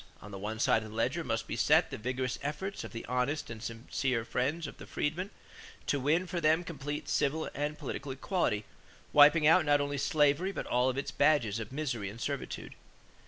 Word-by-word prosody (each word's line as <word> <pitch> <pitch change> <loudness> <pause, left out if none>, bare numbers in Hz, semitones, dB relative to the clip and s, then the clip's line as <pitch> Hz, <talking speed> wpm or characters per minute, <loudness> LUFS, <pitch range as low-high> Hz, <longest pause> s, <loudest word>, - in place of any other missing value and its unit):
On 105 - -11
the 100 - -7
one 110 +3 -4
side 115 - +3
of 110 - -8
the 105 - -10
ledger 130 +9 0
must 115 -6 -1
be - - -4
set - - +4
the - - -4
vigorous 130 +2 -2
efforts 155 +8 -4
of - - -8
the 115 - -6
honest 125 +3 -1
and 110 -1 -7
sincere 115 +1 -2
friends 145 +8 -1
of - - -8
the - - -11
freedmen 175 +6 -2 0.6
to 145 - +1
win 155 +7 +2
for 175 -1 -3
them 160 +2 +3
complete 145 -3 -5
civil 155 +3 0
and 150 +1 -2
political 140 -1 -5
equality, 130 - -1 0.5
wiping 150 +2 +7
out 165 +3 +6
not 145 -1 +4
only 145 0 -1
slavery 150 +6 +2
but - - -4
all 125 +1 +2
its 135 +2 -2
badges 135 -8 +3
of 115 0 -6
misery 130 -8 -2
and 110 +4 -10
servitude. - - -4
140 Hz, 200 wpm, -31 LUFS, 120-155 Hz, 0.6 s, wiping